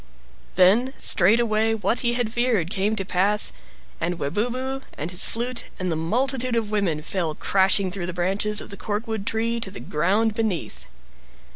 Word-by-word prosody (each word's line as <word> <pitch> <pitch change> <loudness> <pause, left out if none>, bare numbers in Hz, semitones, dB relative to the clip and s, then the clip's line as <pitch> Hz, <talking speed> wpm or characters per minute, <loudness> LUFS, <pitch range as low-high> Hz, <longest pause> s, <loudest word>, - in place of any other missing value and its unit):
Then 225 +9 +4
straightway 220 +3 +3
what 215 +2 0
he 240 0 +1
had 240 -3 -1
feared 235 -9 0
came 210 +1 0
to 195 -3 -3
pass, 200 +3 +3 0.5
and 175 0 -2
Webubu, 245 - -2 0.2
and 160 +4 -4
his 180 - +4
flute, 240 +1 -3
and 185 -1 -1
the - - 0
multitude 245 - 0
of 220 -2 -1
women 180 -8 0
fell 165 -3 -2
crashing 190 +1 +2
through 180 -2 -4
the - - -3
branches 195 +4 0
of - - -10
the 200 - -7
corkwood 215 -1 -4
tree 230 +1 -1
to 210 - -2
the 195 - -9
ground 200 +8 0
beneath. 215 -6 -3
210 Hz, 165 wpm, -23 LUFS, 185-230 Hz, 0.5 s, Then